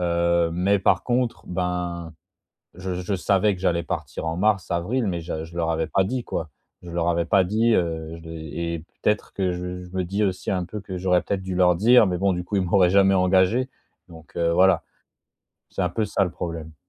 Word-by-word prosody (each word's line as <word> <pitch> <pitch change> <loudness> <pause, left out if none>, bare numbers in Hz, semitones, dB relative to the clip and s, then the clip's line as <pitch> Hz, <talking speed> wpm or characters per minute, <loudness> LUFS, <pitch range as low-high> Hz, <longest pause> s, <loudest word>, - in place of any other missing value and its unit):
Heu, 85 -1 +2
mais 95 +4 +2
par - - +2
contre, 125 -1 -1
ben, 90 -2 -3 0.6
je 90 0 -4
je 90 +2 -2
savais 100 +2 +2
que - - -12
j'allais 85 -2 +1
partir 80 - -5
en 80 +1 -2
mars, 100 -2 +1
avril, 105 +7 0
mais 85 -2 -2
je 80 -1 -4
je 85 +1 -14
leur 80 -1 0
avais 80 0 -1
pas 95 - +2
dit, 125 +3 -2
quoi. 80 - -4 0.3
Je 85 - -9
leur 85 0 0
avais 85 0 +1
pas 95 +2 +4
dit, 110 +5 +2
heu, 80 -2 -2
je - - -13
l'ai 80 +1 -5
et 80 - -5 0.2
peut-être 105 -1 0
que 95 -2 0
je 90 0 -5
je 90 - -12
me 95 - 0
dis 100 +4 -1
aussi 95 -1 -1
un 90 -2 0
peu 105 +4 -6
que 95 -2 -6
j'aurais 90 0 +2
peut-être 100 -1 -2
dû 95 -1 -4
leur 90 -1 +4
dire, 110 +3 +6
mais 90 -1 -1
bon, 100 +1 +2
du 90 0 -3
coup 105 - -3
ils - - +2
m'auraient 90 0 +4
jamais 95 0 +5
engagé, 95 +7 +3 0.4
donc, 80 -1 -15
heu, 85 0 +2
voilà 95 0 +4 0.9
c'est - - -4
un 90 - +1
peu 110 +4 -1
ça, 100 -1 +1
le 90 - -1
problème. 80 -2 -6
90 Hz, 225 wpm, -24 LUFS, 85-100 Hz, 0.9 s, dire